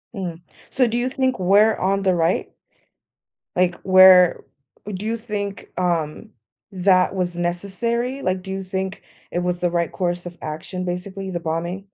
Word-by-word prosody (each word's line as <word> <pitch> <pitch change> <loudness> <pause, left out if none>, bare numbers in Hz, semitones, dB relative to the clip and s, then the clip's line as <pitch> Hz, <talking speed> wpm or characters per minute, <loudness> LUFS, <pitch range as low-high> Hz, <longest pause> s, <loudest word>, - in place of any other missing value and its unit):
Mm. 175 -3 -5 0.3
So, 260 -2 +2
do 230 - -2
you 245 +2 0
think 260 -4 0
we're 205 +4 +5
on 195 +1 0
the 185 -1 +3
right? 170 +1 0 1.0
Like, 180 -1 +2
we're 185 -2 +7 0.4
Do 205 0 -5
you 230 +1 -1
think, 205 -3 -5
um, 170 -4 -1 0.4
that 185 0 +3
was 180 -2 -2
necessary? 215 +9 -2
Like, 185 0 -1
do 190 +1 -8
you 195 0 -3
think 190 +1 -4 0.3
it 175 - -1
was 180 0 -1
the 175 - +1
right 170 -1 -1
course 175 -1 -2
of 175 0 -8
action, 180 +4 -5
basically, 190 +2 -5
the 175 -2 -3
bombing? 170 +3 -3
185 Hz, 160 wpm, -22 LUFS, 175-200 Hz, 1.0 s, we're